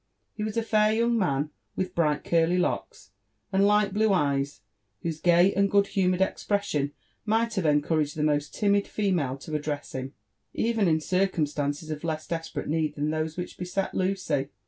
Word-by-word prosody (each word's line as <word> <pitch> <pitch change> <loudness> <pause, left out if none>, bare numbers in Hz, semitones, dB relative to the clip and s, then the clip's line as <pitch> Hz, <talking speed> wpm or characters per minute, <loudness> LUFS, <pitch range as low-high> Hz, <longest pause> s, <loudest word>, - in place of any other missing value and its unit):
He 210 - -4
was 215 +1 -3
a 230 - +2
fair 215 -1 +3
young 235 +2 +2
man, 150 -8 0 0.2
with 185 -1 -2
bright 150 -4 +1
curly 170 +1 +2
locks, 180 - -2 0.4
and 195 +1 +4
light 210 -1 +3
blue 215 +1 +3
eyes, 140 - 0 0.4
whose 160 -2 -3
gay 175 +2 +5
and 200 0 +2
good 200 0 +4
humoured 185 -1 +1
expression 190 -8 -1 0.3
might 225 +2 +1
have 190 -6 0
encouraged 150 0 +1
the 150 - -1
most 150 -1 +1
timid 200 -1 +1
female 175 -11 0
to 155 +3 -9
address 150 -1 -3
him, 130 +1 -5 0.4
even 225 -3 +1
in 160 -1 +3
circum 185 -2 +1
stances 145 +1 -3
of 150 0 -5
less 155 -2 -2
desperate 165 -1 -4
need 155 0 0
than 150 +1 -1
those 155 +1 -2
which 180 - -6
beset 180 +2 -2
Lucy. 185 -7 0
170 Hz, 175 wpm, -27 LUFS, 150-200 Hz, 0.4 s, gay